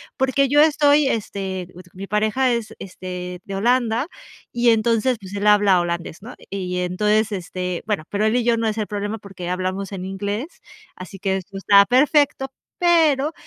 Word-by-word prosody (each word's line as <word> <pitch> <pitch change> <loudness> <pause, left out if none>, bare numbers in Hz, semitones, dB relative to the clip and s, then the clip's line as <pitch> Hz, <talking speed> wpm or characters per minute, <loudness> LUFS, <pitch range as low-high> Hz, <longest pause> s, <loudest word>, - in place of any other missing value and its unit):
porque 265 +1 +2
yo 290 +2 +4
estoy, 295 -2 +4
este, 190 -5 -3 0.2
mi 195 +2 -7
pareja 215 +6 +1
es, 225 -1 -4
este, 180 -1 -7
de 195 - -6
Holanda, 240 +4 +1 0.4
y 240 0 +2
entonces, 230 +2 +2
pues 190 -1 -11
él 205 +1 -1
habla 205 -3 +5
holandés, 170 0 -4
¿no?, 240 +4 -10 0.2
y 185 -2 -3
entonces, 210 +4 +1
este, 180 -2 -4
bueno, 205 -7 -1
pero 205 +1 0
él 220 - +1
y 245 - +2
yo, 235 -1 +2
no 230 - 0
es 220 0 -2
el 215 - -1
problema 205 +1 -4
porque 195 -4 -8
hablamos 185 +2 -3
en 185 -1 -5
inglés, 205 - -5 0.3
así 185 +1 -10
que 190 0 -1
esto 195 +1 -9
está 200 +1 +6
perfecto, 270 +1 +2 0.3
pero, 320 -4 +3
210 Hz, 175 wpm, -21 LUFS, 190-245 Hz, 0.4 s, está